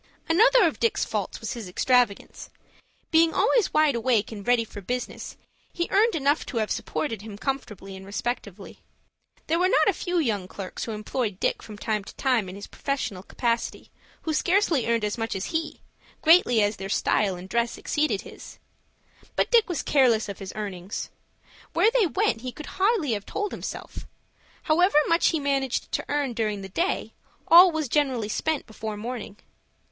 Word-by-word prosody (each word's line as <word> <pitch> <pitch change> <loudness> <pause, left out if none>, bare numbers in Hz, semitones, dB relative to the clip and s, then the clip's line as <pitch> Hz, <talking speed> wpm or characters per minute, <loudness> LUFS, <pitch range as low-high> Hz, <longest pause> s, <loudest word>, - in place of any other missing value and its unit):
Another 460 +10 +5
of - - +1
Dick's 465 - +1
faults - - -3
was - - -4
his 230 -6 -7
extravagance. 245 +2 +1 0.6
Being 325 0 +4
always 440 +2 +3
wide 305 -2 +4
awake 235 -2 +1
and 205 -1 -8
ready 245 -1 +4
for 205 -2 -9
business, 250 +6 -5 0.3
he 345 -1 -2
earned 430 +2 +3
enough 290 0 +1
to 245 - -4
have 215 -2 0
supported 190 +7 -3
him 210 -1 -9
comfortably 210 -7 -4
and 190 - -10
respectably. 205 -1 -5 0.7
There 330 +2 +1
were 365 +1 +3
not - - +4
a - - +4
few 355 -2 -2
young 215 - 0
clerks 190 -1 -6
who 225 - -4
employed 215 -1 -3
Dick - - 0
from 210 -2 -10
time 215 -1 -2
to - - -12
time 245 -8 +1
in 185 - -8
his 200 - -8
professional 270 -9 -3
capacity, 230 +4 -2 0.3
who 320 - -1
scarcely 345 - +2
earned 230 -1 +1
as 210 +3 -3
much 225 -2 -2
as 195 - -4
he, 320 -1 -3 0.4
greatly 310 -9 +5
as 205 0 0
their 195 +1 -6
style 200 -1 +1
and 180 +1 -9
dress 235 +3 -1
exceeded 295 -10 0
his. - - -12 0.8
But - - +1
Dick 460 -4 +5
was 350 - -2
careless 245 -7 +3
of 200 - -7
his 195 -2 -6
earnings. 195 -3 -5 0.6
Where 445 - +4
they 475 -6 +3
went 380 - 0
he 255 0 -5
could 305 - -9 0.2
hardly 390 - +2
have 205 -2 -3
told 415 -1 -3
himself. - - -7 0.6
However 345 +1 +3
much 335 +1 +3
he 325 - +1
managed 275 -3 -1
to - - -2
earn 285 -3 0
during 215 -3 -2
the 195 - -7
day, 340 - -1 0.3
all 350 +2 +9
was 315 -3 -2
generally 255 -6 0
spent 315 +6 -1
before 220 -1 -6
morning. 225 -2 -6
245 Hz, 180 wpm, -25 LUFS, 210-320 Hz, 0.8 s, all